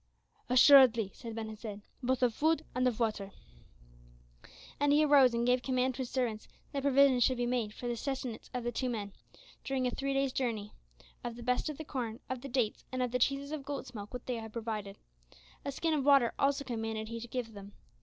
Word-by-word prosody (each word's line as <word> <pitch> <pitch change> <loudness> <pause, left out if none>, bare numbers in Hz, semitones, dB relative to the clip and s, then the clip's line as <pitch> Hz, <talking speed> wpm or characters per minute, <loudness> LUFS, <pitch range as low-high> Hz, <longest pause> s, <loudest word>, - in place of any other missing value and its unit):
"Assuredly," 250 -4 +7
answered 230 +2 -9
Ben 225 -1 -4
Hesed, 210 -1 -8 0.2
"both 255 0 0
of 240 -2 +3
food 315 +4 +1
and 255 0 +2
of 245 -2 -1
water." 210 -4 -1 1.5
And 290 0 +3
he 300 +1 +5
arose 275 -5 +6
and 235 0 0
gave 250 0 +3
command 255 0 0
to - - -11
his 255 -2 -3
servants 235 -5 -2 0.2
that 280 - -2
provision 275 -2 +5
should 255 +1 +3
be 245 - 0
made 240 -3 -1
for 245 - -7
the 240 - -1
sustenance 255 -1 -4
of 250 -1 -3
the 240 - -1
two 255 +2 -2
men, 205 -4 -4 0.5
during 265 -1 -1
a 250 - +1
three 275 +2 -2
day's 275 -1 +1
journey, 220 -6 -2 0.5
of 240 -1 -4
the 240 - -9
best 250 +5 0
of 300 - -6
the 315 - -7
corn, 235 -5 -4
of 255 -2 -3
the 275 - -7
dates, 240 -4 0
and 255 -1 -1
of 250 - -2
the 250 - 0
cheeses 275 +3 0
of 305 -3 -4
goat's 275 -2 -6
milk 205 -2 -8
which 250 -1 -7
they 250 -2 -2
had 220 -1 -7
provided. 215 -3 -5 0.7
A 280 - -3
skin 320 +4 -1
of 295 -3 +1
water 275 -4 +5
also 280 0 +2
commanded 225 -3 -4
he 230 0 -5
to 240 - -7
give 240 -2 -4
them. 200 0 -11
250 Hz, 220 wpm, -32 LUFS, 225-270 Hz, 1.5 s, Assuredly